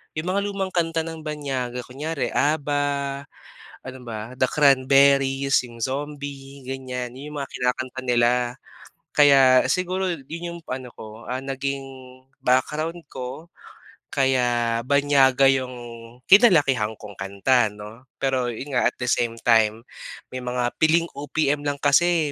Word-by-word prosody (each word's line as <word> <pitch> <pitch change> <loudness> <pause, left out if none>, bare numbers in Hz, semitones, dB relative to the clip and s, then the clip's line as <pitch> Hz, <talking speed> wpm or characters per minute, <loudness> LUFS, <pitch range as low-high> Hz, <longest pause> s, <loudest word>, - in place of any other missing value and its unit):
'Yong 155 +3 -4
mga 200 - +1
lumang 195 -2 -3
kanta 165 -2 0
ng 160 -1 -7
banyaga. 135 -5 -4
Kunyare 145 +4 -4
ABBA, 145 -1 +1 1.0
ano 130 0 -9
ba, 110 +1 -6
The 130 - +3
Cranberries, 135 0 +4
'yong 120 -1 -12
Zombie, 140 0 -5
ganyan. 130 -2 -5
'Yon 145 +3 -9
'yong 150 - -9
mga 140 - -5
kinakanta 130 +1 -2
nila. 120 -1 +3 0.8
Kaya 135 -3 +6
siguro 185 +1 0 0.2
'yon 165 +2 -6
'yong 170 - -9
ano 130 -1 -5
ko, 110 +1 -11
ah, 130 +1 -3
naging 135 0 -3 0.6
background 150 +7 0
ko 130 +5 -7 0.7
kaya 120 -3 +1
banyaga 140 -2 +4
'yong 130 -1 -2 0.5
kinalakihan 145 - +4
kong 105 -3 -12
kanta, 100 +5 +2
'no. 105 +5 -11
Pero 130 -2 -1
'yon 125 +5 -6
nga 125 -2 +2
at - - -3
the 125 - -5
same 115 -1 0
time, 110 -1 +3 0.5
may 130 - -5
mga 125 -1 -2
piling 165 +2 +3
OPM 145 0 -1
lang 145 - 0
kasi 160 +1 +3
135 Hz, 135 wpm, -23 LUFS, 125-145 Hz, 1.0 s, Kaya